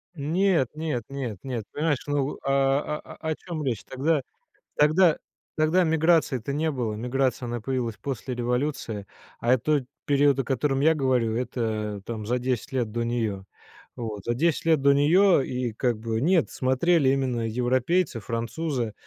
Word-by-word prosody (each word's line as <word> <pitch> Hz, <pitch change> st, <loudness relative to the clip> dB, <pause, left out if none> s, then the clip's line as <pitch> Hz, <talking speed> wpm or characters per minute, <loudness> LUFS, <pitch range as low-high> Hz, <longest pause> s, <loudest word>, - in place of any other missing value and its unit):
Нет, 165 Hz, 0 st, +2 dB
нет, 155 Hz, -7 st, -2 dB
нет, 130 Hz, -7 st, -4 dB
нет, 125 Hz, -5 st, -3 dB
понимаешь, 150 Hz, -2 st, -1 dB
ну, 145 Hz, -1 st, -1 dB
а 135 Hz, +2 st, +1 dB
а -, -, -12 dB
а, 160 Hz, -, -3 dB
о 155 Hz, -, 0 dB
чем 165 Hz, -3 st, -6 dB
речь? 120 Hz, -7 st, -2 dB
Тогда 145 Hz, +3 st, 0 dB, 0.6 s
тогда 155 Hz, +3 st, +5 dB, 0.4 s
тогда 155 Hz, +4 st, +3 dB
миграции-то 160 Hz, -6 st, +2 dB
не 155 Hz, +2 st, 0 dB
было. 120 Hz, -6 st, -2 dB
Миграция, 125 Hz, +2 st, -1 dB
она 120 Hz, 0 st, -3 dB
появилась 120 Hz, -4 st, -2 dB
после 130 Hz, +2 st, -4 dB
революции. 125 Hz, -3 st, -2 dB, 0.3 s
А, 120 Hz, +2 st, +3 dB
э, 130 Hz, -, +4 dB
тот 145 Hz, +3 st, +1 dB, 0.2 s
период, 140 Hz, -1 st, +3 dB
о 135 Hz, -, +1 dB
котором 135 Hz, +1 st, 0 dB
я 160 Hz, +3 st, +5 dB
говорю, 125 Hz, -6 st, +1 dB
это, 110 Hz, -4 st, -2 dB
там, 110 Hz, -3 st, -5 dB
за 125 Hz, +3 st, 0 dB
10 125 Hz, 0 st, -2 dB
лет 120 Hz, -5 st, -1 dB
до 120 Hz, +1 st, -1 dB
неё. 115 Hz, -4 st, -1 dB
Э, -, -, -17 dB, 0.5 s
вот, 110 Hz, -5 st, -5 dB
за 120 Hz, -, +1 dB
10 160 Hz, +6 st, 0 dB
лет 160 Hz, -3 st, +3 dB
до 140 Hz, 0 st, +5 dB
неё 170 Hz, +4 st, +5 dB
и 125 Hz, -3 st, -3 dB
как 120 Hz, 0 st, 0 dB
бы, 110 Hz, 0 st, -2 dB
нет, 170 Hz, +2 st, +3 dB
смотрели 135 Hz, +3 st, +2 dB
именно 130 Hz, -3 st, 0 dB
европейцы, 125 Hz, +6 st, +1 dB
французы, 115 Hz, +2 st, -3 dB
130 Hz, 165 wpm, -26 LUFS, 120-150 Hz, 0.6 s, тогда